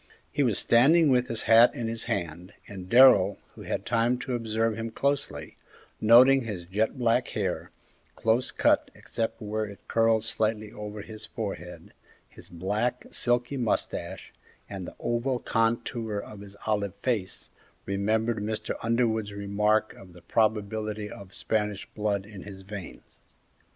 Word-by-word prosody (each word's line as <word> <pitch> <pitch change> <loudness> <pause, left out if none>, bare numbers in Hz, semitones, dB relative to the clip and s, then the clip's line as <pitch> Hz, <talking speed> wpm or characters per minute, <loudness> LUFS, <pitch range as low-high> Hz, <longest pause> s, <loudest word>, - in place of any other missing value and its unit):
He 145 - 0
was 120 -7 +3
standing 150 +7 +5
with 125 -1 +3
his 115 - -3
hat 115 +2 +6
in 120 - -3
his 115 0 -2
hand, 85 +3 -4
and 95 -2 -9
Darrell, 110 -6 +7 0.2
who - - -12
had - - -4
time 120 +1 +2
to 125 - -4
observe 115 -1 0
him 115 +1 -4
closely, 140 +5 -2 0.4
noting 125 +5 +7
his 105 -7 -6
jet 105 +8 -1
black 120 0 +2
hair, 95 -4 -3 0.5
close 115 +3 +1
cut - - +2
excepting 110 -2 -4
where 110 +1 -1
it 100 -1 -12
curled 115 -1 +3
slightly 110 -1 -1
over 105 -2 -7
his 110 0 -8
forehead, 100 -5 -7 0.3
his - - -14
black, 105 +8 -2
silky 120 +3 0
moustache, 115 -5 -2 0.3
and 95 -3 -7
the - - -10
oval 120 +2 -1
contour 115 -1 -1
of 100 0 -7
his 100 0 -11
olive 100 -3 -1
face, 110 -8 -2 0.3
remembered 110 +3 0
Mr. 105 +1 -3
Underwood's 115 -2 0
remark 105 +2 +1
of 90 -2 -15
the 85 -1 -15
probability 105 0 -1
of 100 -1 -11
Spanish 105 -2 -1
blood 105 -2 -1
in 105 -2 -10
his 95 -1 -10
veins. 95 -2 -10
110 Hz, 145 wpm, -27 LUFS, 100-115 Hz, 0.5 s, Darrell